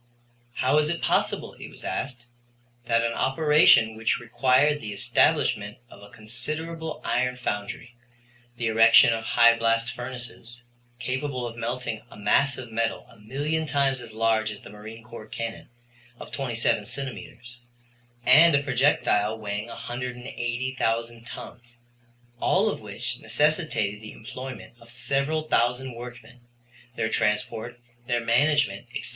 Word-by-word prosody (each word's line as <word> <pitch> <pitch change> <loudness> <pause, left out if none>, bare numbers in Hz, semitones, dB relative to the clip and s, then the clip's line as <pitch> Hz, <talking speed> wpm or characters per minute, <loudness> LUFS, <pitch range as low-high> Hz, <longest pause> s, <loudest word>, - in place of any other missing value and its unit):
How 130 +3 +2
was 150 0 +3
it 170 0 -1
possible, - - 0
it - - -10
was - - -14
asked, 125 -3 -4 0.6
that 115 0 +3
an 115 - 0
operation 135 -5 +5
which 115 +1 0
required 130 +5 +2
the 105 - -5
establishment 100 +1 +1
of 100 - -14
a 100 - -13
considerable 155 +10 -5
iron 125 +1 0
foundry, 110 0 -4 0.6
the 115 - -2
erection 115 +1 +7
of 115 0 -3
high 115 +1 +5
blast 115 +1 +1
furnaces, 125 -1 -8 0.3
capable 130 +1 -3
of 115 -1 -6
melting 115 -1 -3
a - - -13
mass 135 +7 +2
of 125 -3 -8
metal 115 +1 -1
a 115 - -19
million 145 +8 -2
times 135 -3 +1
as 115 - -9
large 110 0 +1
as 105 - -8
the - - -12
marine 110 +2 -10
corps 110 -1 -10
cannon 115 +1 -6 0.5
of - - -10
27 115 -5 0
centimeters, 125 -2 -7 0.7
and 155 +5 +7
a 140 - +2
projectile 125 -6 +2
weighing 105 0 -4
180,000 120 -1 -3
tons, 120 0 -10 0.6
all - - +2
of - - -6
which - - -5
necessitated 150 - 0
the 110 - -9
employment 125 +1 -8
of 115 - -17
several 140 +6 -1
thousand 125 -2 +1
workmen, 120 +1 -10 0.6
their 110 - 0
transport, 110 +3 -1 0.3
their 120 -1 0
management, 120 -4 +2
etc. - - -3
120 Hz, 135 wpm, -26 LUFS, 115-130 Hz, 0.7 s, erection